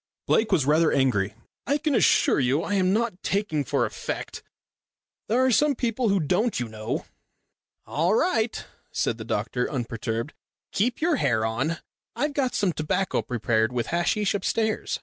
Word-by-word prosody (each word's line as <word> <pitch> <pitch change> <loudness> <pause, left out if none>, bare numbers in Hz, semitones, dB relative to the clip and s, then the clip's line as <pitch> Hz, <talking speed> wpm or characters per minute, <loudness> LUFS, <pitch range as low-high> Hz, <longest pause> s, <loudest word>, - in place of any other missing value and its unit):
Lake 220 -1 +2
was 165 -8 +3
rather 155 +3 +4
angry. 110 -7 +1 0.3
"I 285 +3 +2
can 300 -1 -1
assure 240 - +4
you 135 +5 +1
I 205 - -2
am 185 -2 +2
not 215 -3 0
talking 195 -7 0
for 125 - +1
effect. - - -5 0.9
There 250 +4 +3
are 260 - +3
some 290 +4 +3
people 235 -1 0
who 195 -1 +3
don't, 210 - +1
you 120 - -2
know." 110 -1 -4 0.8
"All 170 +7 +1
right," 230 -7 0 0.3
said 115 - -1
the - - -5
doctor, 115 +3 -2
unperturbed. 115 0 -3 0.4
"Keep 240 +7 0
your 325 -2 +2
hair 110 - +1
on. 135 +9 -1 0.4
I've 295 0 -1
got 270 -3 0
some 195 -4 +1
tobacco 180 +5 0
prepared 115 -1 0
with 120 -3 -2
hasheesh 190 +4 +1
upstairs. 220 +2 -1
175 Hz, 160 wpm, -25 LUFS, -, 0.9 s, rather